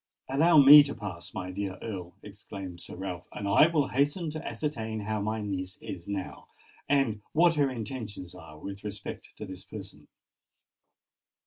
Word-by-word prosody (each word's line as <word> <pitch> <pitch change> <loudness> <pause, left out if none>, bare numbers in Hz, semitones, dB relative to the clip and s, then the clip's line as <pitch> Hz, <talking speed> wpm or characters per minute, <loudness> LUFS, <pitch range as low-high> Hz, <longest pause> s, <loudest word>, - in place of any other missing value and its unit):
"Allow 160 +5 +4
me 145 +1 +11
to 140 -1 -2
pass, 85 -6 -6
my 90 -1 -5
dear 95 0 -4
Earl," 90 -6 -6
exclaimed 95 -3 -8
Sir - - -9
Ralph; 90 -1 -6
"and 100 - -4
I 100 +10 +6
will 155 -4 +1
hasten 145 +5 +1
to 155 +1 -6
ascertain 110 -8 -3
how 105 0 -2
my 110 +1 -1
niece 95 -2 -4
is 85 - -8
now, 100 -2 -5 0.4
and 135 -7 +2
what 170 +1 +5
her 145 -3 +2
intentions 110 -6 -6
are 80 -4 -12
with 100 +5 -8
respect 105 -1 -7
to 105 - -6
this 95 -1 -8
person." 95 -10 -9
105 Hz, 160 wpm, -29 LUFS, 95-140 Hz, 0.4 s, me